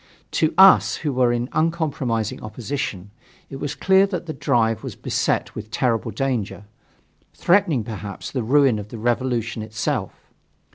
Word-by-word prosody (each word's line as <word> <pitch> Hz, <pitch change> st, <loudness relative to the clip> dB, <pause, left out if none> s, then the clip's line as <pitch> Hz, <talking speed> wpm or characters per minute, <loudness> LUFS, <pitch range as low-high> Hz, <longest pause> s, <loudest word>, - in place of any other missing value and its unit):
To 155 Hz, -, +1 dB
us, 190 Hz, 0 st, +7 dB
who 145 Hz, -, 0 dB
were 125 Hz, -1 st, +3 dB
in 120 Hz, 0 st, -1 dB
uncompromising 145 Hz, -, -1 dB
opposition, 110 Hz, -4 st, -5 dB, 0.4 s
it 135 Hz, -, -6 dB
was 140 Hz, 0 st, -4 dB
clear 190 Hz, +1 st, +4 dB
that 180 Hz, -3 st, -4 dB
the 160 Hz, -, -5 dB
drive 115 Hz, -5 st, +1 dB
was -, -, -6 dB
beset -, -, -1 dB
with 110 Hz, 0 st, -8 dB
terrible 115 Hz, -1 st, 0 dB
danger, 115 Hz, -3 st, -3 dB, 0.7 s
threatening 170 Hz, -, +2 dB
perhaps 105 Hz, -2 st, -7 dB
the 130 Hz, -, -2 dB
ruin 130 Hz, -1 st, +3 dB
of 105 Hz, -, -7 dB
the 115 Hz, -, -9 dB
revolution 120 Hz, -1 st, -1 dB
itself. 110 Hz, 0 st, -4 dB
120 Hz, 145 wpm, -22 LUFS, 110-145 Hz, 0.7 s, us